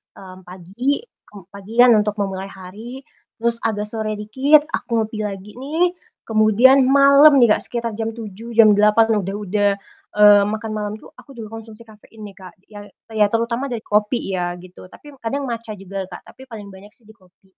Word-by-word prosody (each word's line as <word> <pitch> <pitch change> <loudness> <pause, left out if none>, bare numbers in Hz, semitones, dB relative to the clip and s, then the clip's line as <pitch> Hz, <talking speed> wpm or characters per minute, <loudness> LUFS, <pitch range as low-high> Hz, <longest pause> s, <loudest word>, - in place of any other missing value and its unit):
mmm, 185 -1 -14
pagi, 195 - -3 0.2
kem 205 - -13
pagian 225 +5 +3
untuk 210 0 -2
memulai 195 -2 -4
hari, 210 +8 -11 0.3
terus 230 0 -1
agak 210 -2 -3
sore 220 -1 -3
dikit, 265 +8 +2
aku 230 -2 -1
ngopi 215 0 -7
lagi 200 +1 -9
nih. 320 +7 0 0.3
Kemudian 230 +5 +4
malam 280 +2 +6
nih 240 -5 +5
Kak, - - -12
sekitar 235 -1 -4
jam 225 0 -3
7.00, 225 +1 -9
jam 220 -2 +7
8.00, 210 +2 +3
udah 195 +1 -5
udah, 205 0 0 0.5
eee, 205 -1 +6
makan 220 +1 -4
malam 210 -1 -4
tuh, 215 - -15
aku 275 -3 -16
juga 220 -2 -9
konsumsi 225 0 -14
kafein 220 0 -16
nih 200 -2 -10
Kak, 185 -2 -12 0.2
yang 205 -1 -11 0.2
ya 215 -2 +2
terutama 235 +5 -2
dari 235 -4 -6
kopi 210 0 -1
ya 175 -1 -3
gitu, 180 +1 -14
tapi 290 +10 -15
kadang 275 +5 -4
matcha 230 -4 -6
juga 195 -1 -7
Kak, - - -11
tapi 265 0 -16
paling 210 -5 -10
banyak 195 +2 -15
sih 235 - -23
di 220 - -17
kopi. 190 -2 -28
215 Hz, 185 wpm, -19 LUFS, 200-235 Hz, 0.5 s, jam